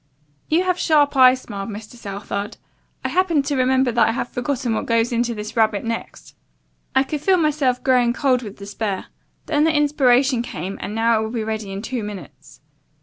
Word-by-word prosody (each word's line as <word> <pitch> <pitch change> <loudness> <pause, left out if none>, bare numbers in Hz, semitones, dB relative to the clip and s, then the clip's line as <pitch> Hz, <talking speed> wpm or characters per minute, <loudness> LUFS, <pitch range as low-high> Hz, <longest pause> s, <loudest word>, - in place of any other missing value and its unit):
"You 330 +4 +3
have 365 -1 0
sharp 295 -3 +3
eyes," 255 -1 +6
smiled 200 -3 -6
Mr. 215 +2 -8
Southard. 200 -2 -5 0.5
"I - - +1
happened 340 -6 +1
to 285 0 -1
remember 260 0 +2
that 235 0 +3
I - - 0
had 245 - -2
forgotten 245 -2 -2
what - - -2
goes 230 +1 +2
into 235 0 0
this 210 0 -7
rarebit 220 -3 +2
next. 230 0 -6 0.6
I 265 - +5
could 285 +2 -4
feel 375 +4 +3
myself 290 -6 +1
growing 250 -2 +3
cold 255 -1 +1
with 210 -4 -9
despair. 200 -1 -4 0.4
Then 295 -1 +1
the 320 - +4
inspiration 270 -3 +3
came 195 -5 -6
and 210 - -5
now 225 0 +3
it - - -1
will - - -4
be 230 -1 -3
ready 215 -2 -4
in 195 +1 -5
two 245 0 -3
minutes." 180 - -10
240 Hz, 195 wpm, -21 LUFS, 215-275 Hz, 0.6 s, eyes